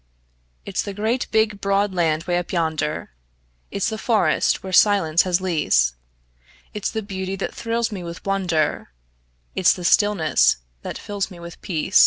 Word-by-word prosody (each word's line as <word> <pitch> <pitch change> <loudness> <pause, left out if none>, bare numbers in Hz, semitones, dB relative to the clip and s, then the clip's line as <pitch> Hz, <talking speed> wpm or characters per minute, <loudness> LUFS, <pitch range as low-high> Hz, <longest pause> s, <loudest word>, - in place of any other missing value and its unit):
It's 200 - -1
the 200 -1 -6
great, 225 +5 -1
big, 220 -2 +1
broad 200 0 +1
land 165 -3 +1
'way 175 0 0
up 175 - -6
yonder, 160 - -1 0.6
It's 200 +2 -1
the 220 -1 -4
forests 225 -2 +2
where 190 -1 -6
silence 185 -6 +5
has 185 0 0
lease; 150 - +2 0.8
It's 210 - -2
the 220 - -3
beauty 190 -1 -4
that 195 - -4
thrills 230 0 -1
me 195 -3 -5
with 170 0 -8
wonder, 180 - 0 0.6
It's 185 - +4
the 180 - -6
stillness 180 -6 +4 0.2
that - - -5
fills 205 -1 -3
me 180 -3 -12
with 170 0 -10
peace. 180 +1 +2
190 Hz, 160 wpm, -22 LUFS, 170-205 Hz, 0.8 s, silence